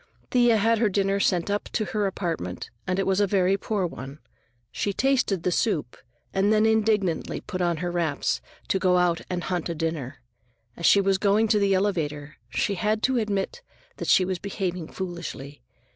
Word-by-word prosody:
Thea 240 -2 +4
had 225 +1 +2
her 220 -2 +3
dinner 195 0 +1
sent 180 -1 +1
up 205 - -1
to 215 - 0
her 205 +2 -1
apartment, 165 - -4 0.2
and 185 0 0
it 195 - +1
was 190 0 +2
a 205 - +3
very 190 -1 +2
poor 200 -1 -1
one. 135 -4 -7 0.5
She 200 - -2
tasted 245 -8 +1
the 180 - +1
soup 170 - 0 0.4
and 195 +2 +2
then 215 0 +4
indignantly 215 -6 +1
put 185 - -5
on 175 -2 +1
her 175 - -1
wraps 165 -5 -1 0.3
to 190 - +2
go 180 -1 +3
out 175 -2 +2
and 180 -1 -2
hunt 180 -2 -2
a 170 - -2
dinner. 150 -5 -4 0.5
As 170 - +1
she 200 - +6
was 195 -1 +2
going 210 +2 +3
to 210 -1 +4
the 200 -1 +3
elevator, 155 -7 -1
she 125 +11 0
had 215 +3 0
to 260 -2 +2
admit 210 - -2 0.4
that - - -5
she 185 - +5
was 185 -1 -2
behaving 180 -4 -3
foolishly. 170 -6 -6
190 Hz, 190 wpm, -25 LUFS, 170-205 Hz, 0.5 s, she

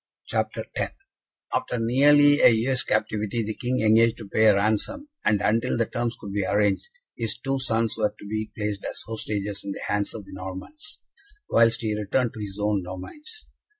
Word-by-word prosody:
CHAPTER - - -1
X - - -2 0.6
After - - -1
nearly 145 +5 +5
a - - +8
year's 125 +3 +1
captivity, 110 +1 -1
the 110 +1 -3
King 125 +3 -1
engaged 115 +1 +4
to 110 - -9
pay 110 +3 +2
a 105 -2 +7
ransom, 110 - 0
and, 105 - +3
until 115 +3 +1
the 115 - +2
terms 120 +1 -3
could 100 - -7
be 100 -1 0
arranged, 100 -1 +1 0.3
his 115 -2 -2
two 135 0 -2
sons 115 -3 0
were 105 -1 +3
to - - -12
be 110 +1 -3
placed 105 -2 -3
as - - -5
hostages 105 -2 -3
in 100 - -4
the - - -8
hands 105 0 -1
of 110 - -6
the - - -13
Normans, 95 - -8 0.5
whilst 115 0 +4
he 110 -2 -1
returned 110 +4 0
to 110 - -9
his 100 -2 -6
own 105 -1 +1
domains. 195 - -9
110 Hz, 185 wpm, -25 LUFS, 105-120 Hz, 0.6 s, a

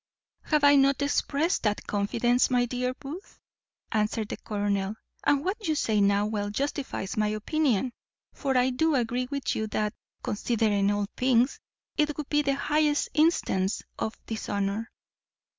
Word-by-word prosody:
"Have 300 -2 +2
I 285 0 +7
not 275 0 +4
exprest 290 +4 +1
that 210 -2 -1
confidence, 235 +4 +1
my 245 -1 +3
dear 250 +1 -2
Booth?" 310 +9 -9 0.5
answered 215 0 0
the - - -4
colonel. 205 -1 -1 0.3
"And 285 0 +2
what 405 +1 -2
you 310 - +2
say 220 -7 +1
now 200 +1 +3
well 210 -1 -2
justifies 270 -4 -3
my 215 0 +2
opinion; 240 +2 0 0.4
for 270 -3 0
I 250 +1 +3
do 315 +4 +2
agree 245 0 0
with 280 -1 -2
you 220 - -1
that, 210 0 -1 0.3
considering 210 -2 +1
all 205 0 +1
things, 250 0 +3 0.4
it 300 -1 +1
would 300 -2 -5
be 295 0 +3
the 275 -1 +1
highest 295 +1 +1
instance 235 - +2 0.2
of 220 - -2
dishonour." 205 0 -2
245 Hz, 150 wpm, -27 LUFS, 210-285 Hz, 0.5 s, I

